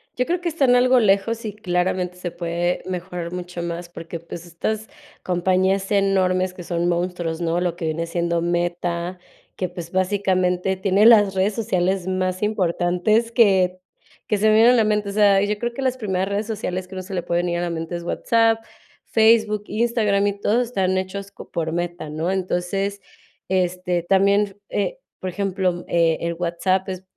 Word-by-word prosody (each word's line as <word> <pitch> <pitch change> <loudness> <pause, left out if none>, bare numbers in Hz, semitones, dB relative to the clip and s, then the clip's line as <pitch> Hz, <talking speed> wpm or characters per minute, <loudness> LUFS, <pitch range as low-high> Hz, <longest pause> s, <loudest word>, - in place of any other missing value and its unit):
Yo 250 - 0
creo 350 +1 0
que 350 - -3
están 275 -6 +3
algo 250 0 +5
lejos 220 +3 +2
y 210 -2 -4
claramente 180 -2 -1
se 180 -1 -4
puede 170 +1 -2
mejorar 180 -1 -5
mucho 180 -1 -5
más, 170 0 -5
porque, 165 0 -7
pues, 170 +1 -9
estas 210 +6 -3 0.4
compañías 190 +2 +1
enormes 185 -2 +2
que 180 - -10
son 170 0 -1
monstruos, 175 -1 -2
¿no? 170 +1 0
Lo 175 -2 -1
que 170 -1 -5
viene 160 +1 -1
siendo 170 0 -1
Meta, 175 +1 -1 0.4
que, 185 - -3
pues, 175 -1 -8
básicamente, 185 -1 +1
tiene 195 +3 +4
las 205 -4 +6
redes 195 +2 +1
sociales 185 -3 0
más 185 0 -1
importantes 205 +3 +1
que 190 -6 +3 0.5
que 210 - +1
se 215 +2 +2
me 215 - +5
vienen 225 +3 +7
a - - +4
la 225 - +4
mente. 210 -1 0
O - - -3
sea, 200 -1 +4
yo 205 +1 0
creo 240 0 -2
que 270 - -5
las 260 -1 0
primeras 190 -4 -1
redes 205 +2 -1
sociales 185 -4 -3
que 190 - -13
a - - -6
uno 185 - -4
se 195 - -9
le 175 - -2
pueden 175 0 0
ir 175 - -1
a 175 - -2
la 175 - -1
mente 165 +1 -4
es 170 - -5
WhatsApp, 225 +4 +2 0.4
Facebook, 220 -2 +3
Instagram 215 -3 +1
y 200 0 -2
todo 220 +4 +2
están 190 -6 0
hechos 195 +1 -4
co - - -12
por 160 -1 -2
Meta, 175 -2 -3
¿no? 160 +4 -2
Entonces, 195 +2 -2 0.5
este, 180 -1 0
también, 200 +2 +2
eh, - - -2 0.2
por 185 - -4
ejemplo, 185 -2 -1
eh, 165 -1 +2
el 170 0 -1
WhatsApp 180 +3 0
es, 185 0 -5
185 Hz, 190 wpm, -22 LUFS, 175-205 Hz, 0.5 s, vienen